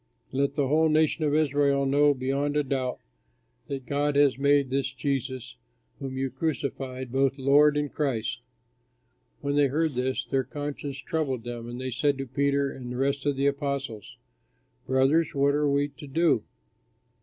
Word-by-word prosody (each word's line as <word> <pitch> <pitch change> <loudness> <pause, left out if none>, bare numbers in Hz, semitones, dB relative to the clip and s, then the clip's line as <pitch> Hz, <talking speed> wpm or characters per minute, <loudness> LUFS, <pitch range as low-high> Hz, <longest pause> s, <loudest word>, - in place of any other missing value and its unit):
Let 140 +1 0
the 140 -2 +1
whole 160 +3 +3
nation 155 +1 +2
of 145 0 +1
Israel 140 -2 +2
know 145 +1 +4
beyond 140 +3 -1
a 150 - +2
doubt 130 -2 -2 0.7
that 135 -2 -5
God 145 +1 0
has 145 -2 +4
made 140 -1 +3
this 135 0 0
Jesus, 130 - -3 0.4
whom 135 -1 -5
you 135 -1 -1
crucified, 130 -3 -3
both 135 +1 +1
Lord 145 +2 +5
and 145 -1 -2
Christ." 125 -6 -1 1.0
When 140 0 -1
they 145 -1 +4
heard 155 +3 0
this, 130 +1 -1
their 135 -1 0
conscience 145 -2 -5
troubled 135 -4 -2
them, 120 0 -6
and 120 +1 -6
they 130 0 -3
said 140 +3 +1
to 135 - -4
Peter 140 +2 0
and 125 -2 -8
the 125 - -4
rest 140 +2 0
of 145 - +2
the 135 +1 0
apostles, 140 -6 -2 0.7
"Brothers, 135 +5 +2
what 140 +1 +3
are 145 0 +2
we 140 +1 +1
to 145 - -12
do?" 145 -6 +2
140 Hz, 165 wpm, -27 LUFS, 130-145 Hz, 1.0 s, Lord